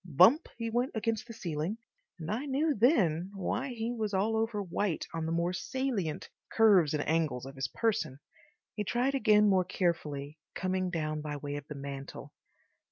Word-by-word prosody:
Bump 185 - +5
he 230 -1 -3
went 245 +3 0
against 225 0 -1
the 230 - -8
ceiling, 170 0 -3 0.4
and 160 +3 -4
I 250 +7 -2
knew 290 +3 +1
then 195 - +3
why 230 +7 -2
he 235 -2 -3
was 215 -4 -2
all 210 +4 +1
over 220 -1 0
white 185 -1 -1
on 165 -1 -2
the - - -2
more 170 +2 0
salient 220 - -2 0.2
curves 195 -9 +5
and 145 - -2
angles 155 -6 0
of 135 - -8
his 135 - -2
person. 210 - -1 0.5
He 210 - -2
tried 245 +6 +1
again 215 -5 +5
more 190 -2 +4
carefully, 155 -5 -2 0.2
coming 185 0 -1
down 155 -3 -2
by 150 -1 -4
way 145 0 -5
of 145 0 -7
the 150 - -7
mantel. 140 0 -7
185 Hz, 175 wpm, -31 LUFS, 155-225 Hz, 0.5 s, Bump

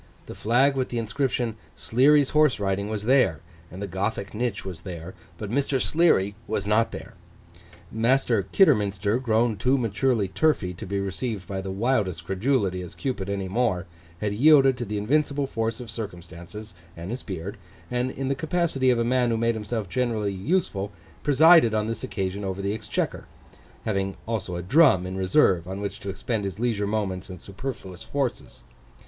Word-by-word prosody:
The - - -8
flag 130 +5 +2
with 130 -1 -1
the 120 - -3
inscription 115 0 -1 0.2
SLEARY'S 140 +4 +4
HORSE 150 -5 +3
RIDING 100 +1 -1
was 105 -1 -3
there; 120 - +3 0.3
and 95 +4 -7
the - - -3
Gothic 100 +2 -3
niche 115 -1 -2
was 90 -4 -6
there; 85 0 -7 0.2
but 105 +1 -6
Mr. 135 +1 +1
Sleary 140 - +3
was 105 -2 -2
not 115 +2 +2
there. - - -8 0.8
Master 115 -1 +2
Kidderminster, 105 - +3
grown 115 -2 +1
too 130 +7 +2
maturely 115 -2 +1
turfy 95 -2 +1
to 100 +4 -8
be 100 +1 -1
received 100 0 -3
by 95 -1 -3
the 95 - -6
wildest 95 -5 0
credulity 95 -1 0
as 90 -2 -8
Cupid 115 -8 -3
any 100 -1 -2
more, 95 -3 0 0.4
had 105 -1 -1
yielded 135 +2 +6
to 120 - -2
the 105 0 -3
invincible 140 +6 +1
force 115 -3 -2
of 120 -3 -7
circumstances 90 -1 -8 0.2
(and 85 +5 -6
his 125 +1 -4
beard), 95 +3 -6 0.3
and, 125 +1 0
in 135 +1 -4
the 135 - +1
capacity 160 -3 0
of 125 - +3
a 115 - +1
man 125 0 +2
who 115 - +1
made 115 +1 +2
himself 110 -1 -3
generally 110 -1 -1
useful, 100 - -1 0.3
presided 150 -4 +6
on 105 0 +1
this 115 0 -4
occasion 95 +1 -3
over 95 0 -3
the 100 +1 0
exchequer—having 105 -2 -4
also 105 -6 -3
a 85 - -4
drum 125 - +5
in 95 +1 -5
reserve, 95 -2 +3
on 95 +1 -5
which 100 -1 -4
to 100 - -6
expend 110 +2 -2
his 95 0 -4
leisure 110 -4 0
moments 100 -4 -2
and 90 -1 -8
superfluous 100 -3 -7
forces. 140 -4 -3
110 Hz, 175 wpm, -25 LUFS, 95-125 Hz, 0.8 s, yielded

